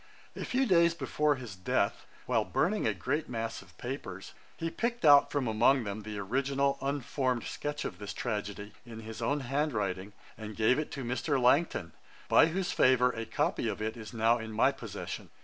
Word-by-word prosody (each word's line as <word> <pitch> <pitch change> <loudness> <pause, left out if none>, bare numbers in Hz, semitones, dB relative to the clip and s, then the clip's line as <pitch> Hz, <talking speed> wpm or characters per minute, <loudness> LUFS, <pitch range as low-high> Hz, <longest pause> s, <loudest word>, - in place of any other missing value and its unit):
A - - -5
few 265 +2 +1
days 170 -5 +4
before 150 -3 +1
his 120 -7 -8
death, 95 -1 -1 0.2
while - - +2
burning 205 - 0
a 110 - +2
great 140 - -2
mass 115 -2 -3
of 95 -2 -19
papers, 110 -7 -6 0.2
he 165 0 -3
picked 235 +3 -2
out 145 -1 +8
from 140 -4 0
among 120 +4 +3
them 100 0 -4
the 105 0 -6
original 140 +6 0
unformed 135 -3 -1
sketch 145 0 -4
of 90 - -5
this 105 -1 -5
tragedy, 105 -2 -4
in 115 -2 -9
his 110 +1 -8
own 140 +5 0
hand 140 +3 -1
writing, 100 -1 -2 0.3
and 110 -1 -7
gave 115 +5 +3
it 155 - -3
to 135 - -4
Mr. 130 +4 0
Langton, 125 - +2 0.4
by - - +6
whose 180 +2 -1
favour 125 -1 +4
a 115 -2 -5
copy - - 0
of - - -3
it 110 +2 -2
is 110 -2 -9
now 115 0 +2
in 110 0 -6
my 110 - +3
possession. - - -7
125 Hz, 190 wpm, -31 LUFS, 110-145 Hz, 0.4 s, out